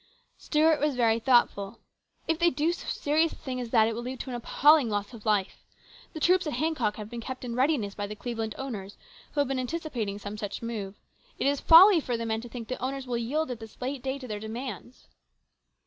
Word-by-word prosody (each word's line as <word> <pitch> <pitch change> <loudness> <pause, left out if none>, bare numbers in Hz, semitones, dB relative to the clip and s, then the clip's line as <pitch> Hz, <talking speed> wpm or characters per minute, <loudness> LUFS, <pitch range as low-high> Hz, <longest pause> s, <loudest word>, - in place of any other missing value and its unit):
Stuart 310 0 +3
was 295 -2 +1
very 230 -2 +3
thoughtful. 225 -5 +2 0.5
"If 325 0 0
they 345 0 +5
do 315 +1 0
so 345 - -7
serious 315 +3 +1
a - - -10
thing 255 -3 -5
as 240 - -5
that, 225 -2 +4
it 230 - -1
will 235 - -4
lead 255 +1 -6
to 260 - -6
an - - -3
appalling 285 +2 +4
loss 205 +3 -3
of 220 -2 -10
life. 205 -3 0 0.5
The 315 - -6
troops 365 +2 +3
at 300 - -2
Hancock 255 -5 0
have 210 -1 -7
been 235 +1 -7
kept 260 +1 -6
in 235 -1 -4
readiness 255 -6 +1
by 205 0 -4
the 210 - -7
Cleveland 225 -1 -4
owners, 210 -8 -6 0.4
who 290 - +2
have 285 - 0
been 270 0 -1
anticipating 250 -7 -3
some 205 +1 -7
such 205 +2 -5
move. 210 -4 -4 0.4
It - - -2
is 280 0 +1
folly 350 +3 +8
for 245 -5 -2
the 230 - -4
men 220 0 -1
to 240 - -10
think 230 -2 -7
the 255 - -5
owners 270 +1 -3
will 250 -1 -3
yield 280 +5 -1
at 240 - -5
this 225 -1 -12
late 260 +1 -3
day 265 +1 -2
to 260 -2 -9
their 210 -2 -4
demands." 235 +2 -7
245 Hz, 230 wpm, -28 LUFS, 220-285 Hz, 0.5 s, folly